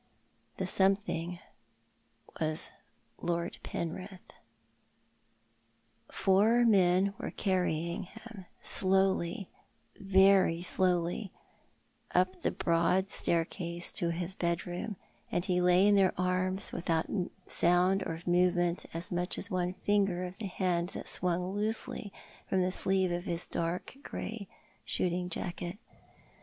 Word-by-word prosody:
The - - -1
something 190 -3 +1 1.0
was 155 0 -1 0.5
Lord 170 0 -2
Penrith. 185 +3 -6 1.8
Four 215 +5 +4
men 190 -2 +4
were - - -3
carrying 180 -1 -1
him 220 -2 -12
— - - -36
slowly 190 -1 +2 0.3
— - - -40
very 190 -3 +4
slowly 180 +2 +1 0.4
— - - -24
up 185 0 0
the - - +1
broad 175 +3 +1
staircase 170 +1 -1
to 170 - -1
his 170 +2 -3
bed 170 -1 -1
room, 180 +4 -4 0.4
and 175 - 0
he 180 -1 +1
lay 180 +2 +5
in 205 - +5
their 195 -2 +3
arms 185 +1 0
without 165 -1 0 0.4
sound 180 +3 +3
or 165 0 -4
movement 175 0 +2
of 165 - -3
so 180 - -6
much 175 +1 -1
as 200 - -6
one 180 0 -1
finger 195 -3 +2
of 180 +1 -7
the 215 - -3
hand 180 -2 0
that - - -6
swung 180 +1 -1
loosely 210 0 -2 0.4
from 185 -1 +2
the 185 - 0
sleeve 190 -1 +1
of 175 +1 -2
liis 170 -2 -2
dark 170 +7 -3
grey 225 -7 -6 0.4
shooting 180 0 -1
jacket. 175 +1 -4
180 Hz, 125 wpm, -31 LUFS, 175-195 Hz, 1.8 s, lay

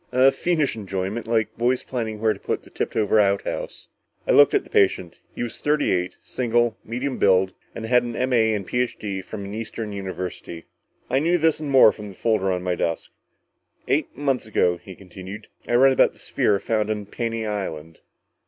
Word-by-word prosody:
A 130 +2 +5
fiendish 155 0 0
enjoyment 100 +2 -4
like 115 -2 0
boys 125 +2 +1
planning 110 -4 -4
where 110 0 +2
to - - -13
put - - -3
the - - -18
tipped - - -3
over 110 0 +3
outhouse." 100 -1 -1 0.4
I - - +3
looked - - +6
at - - +2
the - - -17
patient. 95 -3 +1 0.2
He - - -3
was 120 - -6
thirty 150 0 +1
eight, 90 0 -1
single, 120 -2 0
medium 125 +4 -3
build, 95 -1 +3 0.2
had 120 +2 +2
an 120 -1 -5
M.A. 120 -4 +2
and 100 -2 -4
Ph.D. 110 -5 -2
from 100 +1 -7
an 100 - -7
eastern 110 -1 -5
university. 95 -3 -6 0.4
I 130 - +2
knew 170 +4 +2
this 160 -2 +2
and 150 -2 -4
more 130 -5 +7
from 105 -1 -9
the 95 - -12
folder 105 -4 +1
on 90 -1 -2
my 90 -1 0
desk. 85 -1 -2 0.8
"Eight - - 0
months 135 -5 -1
ago," 90 -4 +2
he 90 +2 -12
continued, 95 +3 -10 0.2
"I 120 - +1
read 135 +2 +6
about - - +4
the - - -21
sphere 100 -1 +1
found 110 -1 -1
on 105 -1 -2
Paney 115 +1 -3
Island." 80 -7 -5
110 Hz, 190 wpm, -23 LUFS, 95-125 Hz, 0.8 s, more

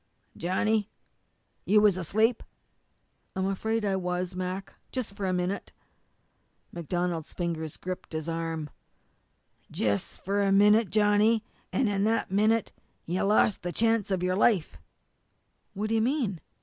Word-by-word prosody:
"Johnny, 205 +4 0 0.7
you 210 +2 +4
was 210 -3 +5
asleep!" 220 +7 +1 0.9
"I'm 190 0 0
afraid 220 +3 -1
I 195 -1 +1
was, 180 0 -2
Mac 185 +1 -4 0.2
just 245 -6 -4
for 200 -1 -3
a - - +1
minute." 180 +2 -2 1.0
MacDonald's 175 -1 -3
fingers 165 -3 -3
gripped 185 -2 -6
his 160 0 -3
arm. 165 -2 -3 1.0
"Jus' 100 -2 -1
for 200 +2 -1
a 200 -1 +2
minute, 210 +1 +5
Johnny 210 +2 +3 0.3
an' 255 - +1
in 200 -1 0
that 225 -3 0
minute 215 +2 +2 0.3
you 175 +3 -1
lost 210 0 +3
the 175 - -3
chance 225 0 +1
of 185 -2 0
your 185 0 +1
life!" 185 - +2 1.0
"What 210 +2 -2
do - - 0
you 225 - +3
mean?" 235 - 0
195 Hz, 135 wpm, -28 LUFS, 180-215 Hz, 1.0 s, was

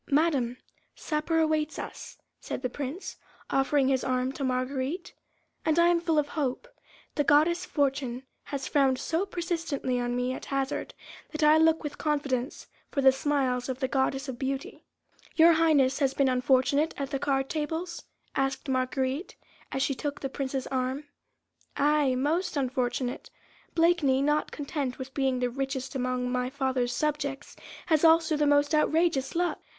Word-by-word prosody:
"Madame, 280 -5 +2 0.4
supper 310 +1 -1
awaits 310 -1 +1
us," - - -7 0.2
said - - -6
the 250 - 0
Prince, 290 +8 -5 0.3
offering 270 0 +2
his 265 -1 +1
arm 255 0 0
to 275 - -5
Marguerite, 260 +6 -2 0.5
"and 315 0 +1
I 340 0 +6
am 345 -1 +2
full 330 -2 +1
of 295 -1 +2
hope. 290 - -2 0.5
The 290 - +1
goddess 330 +5 +3
Fortune 275 -5 -1 0.2
has 275 -2 -4
frowned 270 -3 +3
so 330 +9 -1
persistently 330 -8 -2
on 245 0 -1
me 250 +1 0
at - - -7
hazard, 275 0 -2 0.3
that 310 0 -3
I 305 +1 +6
look 320 0 +4
with 295 -1 -6
confidence 280 -3 -1 0.2
for 280 - -1
the 265 0 +7
smiles 265 -2 0
of 260 0 -3
the 260 - 0
goddess 270 +1 0
of 250 -3 -6
Beauty." 275 +9 -4 0.5
"Your 335 +1 +7
Highness 295 -5 +3
has 275 -2 +1
been 275 - +3
unfortunate 260 +4 +2
at 275 -1 -4
the 275 - -1
card 270 -1 0
tables?" 325 +3 -3 0.3
asked 270 +1 -1
Marguerite, 260 +4 -1 0.4
as 270 - 0
she 280 - +1
took 290 +2 -4
the 270 - -3
Prince's 265 -1 -3
arm. 260 +2 -2 0.7
"Aye! 290 -2 +3
most 310 +6 0
unfortunate. 255 -1 -2 0.5
Blakeney, 325 -6 +3
not 295 +1 +1
content 280 -3 -3
with 265 0 -7
being 265 -2 +1
the 250 -1 0
richest 270 0 -3
among 250 -1 -1
my 250 0 0
father's 260 -3 -1
subjects, 290 -1 -2 0.3
has 315 -2 +2
also 325 -1 +5
the 295 0 +2
most 290 +1 +3
outrageous 310 -2 +2
luck. 350 +1 0
275 Hz, 160 wpm, -28 LUFS, 260-310 Hz, 0.7 s, the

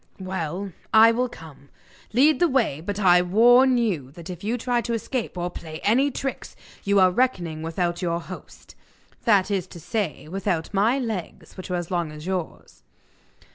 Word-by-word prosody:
'Well, 185 0 -4 0.2
I 220 +1 +7
will 250 +2 0
come. 145 -8 -14 0.4
Lead 285 +7 +4
the 350 - +4
way, 235 - 0
but 205 +2 -4
I 180 -3 +5
warn 245 +8 +5
you 185 - -1
that 170 +2 -9
if 180 0 -9
you 225 +4 -1
try 245 0 0
to 235 0 -2
escape 230 -2 -4
or 175 0 -2
play 160 -2 -8
any 255 +7 +3
tricks 270 0 -5 0.3
you 200 0 +3
are 185 -1 +5
reckoning 180 -9 0
without 170 +2 -2
your 170 -1 -1
host 185 +2 -11 0.5
that 205 -4 +3
is 190 -2 -1
to 175 - -11
say, 195 -4 -3
without 175 -1 -2
my 215 +7 +2
legs, 220 -10 -5
which 185 - -9
are 180 - -1
as 175 0 -4
long 170 -3 -1
as 150 +1 -10
yours! 185 -3 -5
190 Hz, 175 wpm, -24 LUFS, 170-230 Hz, 0.5 s, I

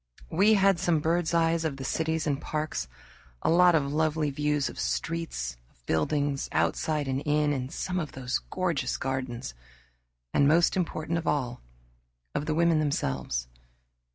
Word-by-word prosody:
We 200 +6 +5
had 195 -2 +4
some 175 -3 +2
bird's 165 +2 +1
eyes 165 -1 +2
of 150 -4 -2
the 135 - -6
cities 160 +3 -1
and 145 -2 -1
parks; 150 - -3 0.6
a - - +3
lot 175 0 +6
of 140 -2 +1
lovely 155 -1 +1
views 150 0 0
of - - -7
streets, 160 - -2
of - - -33
buildings, 140 - 0
outside 150 -3 0
and 135 +1 -1
in, 150 0 +2
and 130 -1 -3
some 185 +1 -2
of 155 -4 -4
those 130 -1 -2
gorgeous 170 -9 -1
gardens, 130 - -3 0.8
and, 140 - +4
most 165 +3 +4
important 170 -2 -1
of 165 - -7
all, 125 -4 -1 0.7
of 150 - -2
the 155 - 0
women 170 -1 +3
themselves. 65 - -1
150 Hz, 155 wpm, -28 LUFS, 135-165 Hz, 0.8 s, lot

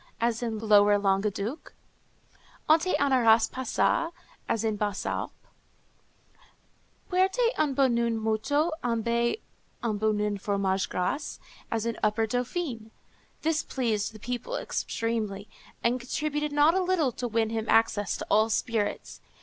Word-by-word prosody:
_ - - -27 0.2
as 230 0 0
in 230 -2 -2
lower 205 -1 +5
Languedoc; 200 +5 -1 0.9
"Onté 325 +4 +4
anaras 230 -5 +4
passa?" 260 +6 0 0.4
as 225 - 0
in 220 -1 +1
the - - -5
Basses 205 -2 -2
Alpes; - - -3 1.7
"Puerte 385 +6 +2
un 295 -3 0
bouen 235 -4 +2
moutu 265 +9 +1
embe 235 - 0 0.4
un 215 -3 -1
bouen 210 -1 0
fromage 195 -1 0
grase," 280 +11 -2 0.3
as 225 -1 -1
in 230 -1 -2
upper 215 +1 +2
Dauphiné. 245 0 -3 0.5
This 320 0 +1
pleased 225 -6 -1
the - - -10
people 245 - -4
extremely, 220 - -3 0.4
and 240 +2 +2
contributed 300 +4 -2
not 295 +3 +4
a 380 - +2
little 355 -7 +1
to 245 +1 -4
win 225 -1 0
him 225 -1 -2
access 215 -3 +2
to - - -5
all 215 +1 +3
spirits. 220 -1 -2
230 Hz, 135 wpm, -28 LUFS, 215-280 Hz, 1.7 s, lower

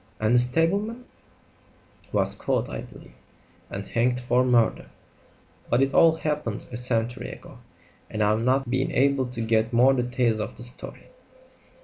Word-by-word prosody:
"And 110 +2 +1
the 125 - +6
stableman 195 - 0 0.5
?" - - -31
"Was - - +1
caught, - - -2
I - - -5
believe, - - -14 0.6
and 100 0 -6
hanged 125 +3 0
for 125 0 +1
murder; 120 -3 +2 0.8
but 120 +3 +3
it 135 0 -1
all 165 -1 +5
happened 150 -9 -3
a 120 - -4
century 120 -1 0
ago, - - -12 0.5
and 110 0 -1
I've 105 +2 +2
not 130 +2 +1
been 130 +2 -1
able 135 -1 +2
to 125 -2 -6
get 110 0 +1
more 125 +3 +5
details 125 -3 0
of 105 - -5
the - - -6
story." 125 +1 -7
125 Hz, 155 wpm, -25 LUFS, 115-135 Hz, 0.8 s, the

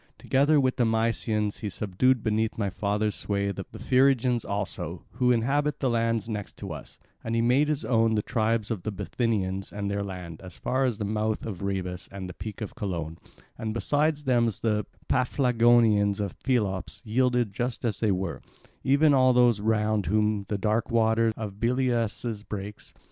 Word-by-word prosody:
Together 145 +3 +3
with 130 -2 +1
the 125 - +3
Mysians 110 -2 0
he 105 - -3
subdued 110 +6 +1
beneath 110 0 0
my 100 -3 -1
father's 105 +2 -1
sway 100 -1 -1
the 95 0 -5
Phrygians 130 -2 +3
also, 100 0 -4
who 125 0 +2
inhabit 140 +5 +1
the 130 -3 +1
lands 115 -1 0
next 105 -3 -5
to - - -6
us, - - -10 0.3
and 115 0 -2
he 115 - +2
made 130 +5 +3
his 150 -1 0
own 115 -2 +3
the 105 - 0
tribes 115 -2 0
of 105 -5 -2
the 110 - -3
Bithynians 95 -2 -2
and 100 -1 -3
their 100 0 -1
land, 90 -4 -7
as 90 -3 -10
far 130 +1 0
as 120 -5 0
the 105 - -3
mouth 110 +1 -1
of 100 -6 -5
Rhebas 95 -2 -3
and 95 -1 -6
the 90 - -7
peak 105 +2 -8
of 110 - -5
Colone; 85 -5 -4 0.4
and 110 0 -3
besides 150 +4 +1
them 120 -3 +3
the 105 -1 -1 0.2
Paphlagonians 120 -5 +3
of 100 -4 -4
Pelops 105 -8 -1
yielded 120 -1 +1
just 120 +3 -3
as 110 -4 -1
they 110 -3 +2
were, 95 -2 -2 0.4
even 145 +3 +4
all 130 -1 +5
those 120 -3 +4
round 105 -2 +1
whom 105 +1 +1
the 105 - 0
dark 110 +4 0
water 115 -1 +3
of 105 -2 -6
Billaeus 120 -3 0
breaks. 105 0 -7
110 Hz, 175 wpm, -27 LUFS, 100-125 Hz, 0.4 s, all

